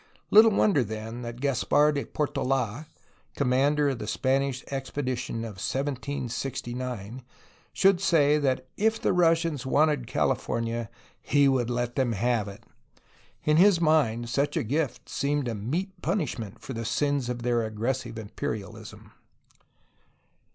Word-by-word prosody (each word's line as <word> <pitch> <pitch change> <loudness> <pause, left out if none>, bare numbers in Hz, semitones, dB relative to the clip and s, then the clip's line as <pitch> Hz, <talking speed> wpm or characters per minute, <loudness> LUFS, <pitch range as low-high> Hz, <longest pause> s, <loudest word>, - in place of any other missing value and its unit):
Little 220 +2 +8
wonder, 200 - +3
then, 110 +2 -6
that 120 +1 -7
Caspar 145 +2 +3
de 140 -1 -2
Portola 135 -2 -1 0.5
(commander 140 +2 +2
of 130 -3 -3
the 105 - -5
Spanish 130 +4 0
expedition 130 -4 -3
of 100 -4 -8
1769) 130 -4 -4 0.5
should 195 -2 +3
say 150 -5 +4
that 130 -2 0
if 220 +2 +2
the - - +1
Russians 165 -5 +2
wanted 145 -2 +2
California, 115 0 -1 0.3
he 145 0 +3
would 130 -3 +1
let 120 0 -2
them 130 -4 +1
have 115 0 0
it; 100 0 -10 0.8
in 150 0 +3
his 185 0 +6
mind 140 -8 +2
such 140 +4 0
a - - +1
gift 130 0 -2
seemed 145 -1 -1
a 115 - -2
meet 160 - -4
punishment 115 - -2
for 135 - -7
the 115 -1 -4
sins 135 +2 0
of 120 -1 -4
their 120 -1 +1
aggressive 115 +2 -3
imperialism 110 0 -6
130 Hz, 130 wpm, -27 LUFS, 115-145 Hz, 0.8 s, Little